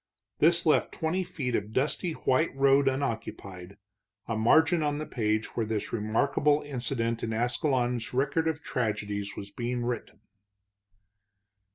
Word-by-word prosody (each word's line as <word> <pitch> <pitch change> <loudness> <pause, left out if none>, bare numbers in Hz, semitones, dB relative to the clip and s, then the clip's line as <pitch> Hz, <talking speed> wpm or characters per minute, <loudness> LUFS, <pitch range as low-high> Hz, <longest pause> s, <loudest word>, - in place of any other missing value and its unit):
This - - +4
left - - +3
twenty 170 +4 -1
feet 130 -8 -4
of 105 +2 -3
dusty 150 +6 0
white 135 +1 +1
road 135 0 +4
unoccupied, 100 -8 -3 0.5
a 115 - -1
margin 160 +9 +4
on 145 -1 0
the 155 - -4
page 110 -4 -1
where 115 - 0
this 110 -1 -3
remarkable 140 +7 +1
incident 120 -4 -2
in 115 - -2
Ascalon's 120 0 0
record 140 +5 +1
of 160 -2 -2
tragedies 105 -3 -2
was 100 0 -8
being 120 0 -3
written. 120 -3 -4
125 Hz, 135 wpm, -28 LUFS, 110-145 Hz, 0.5 s, This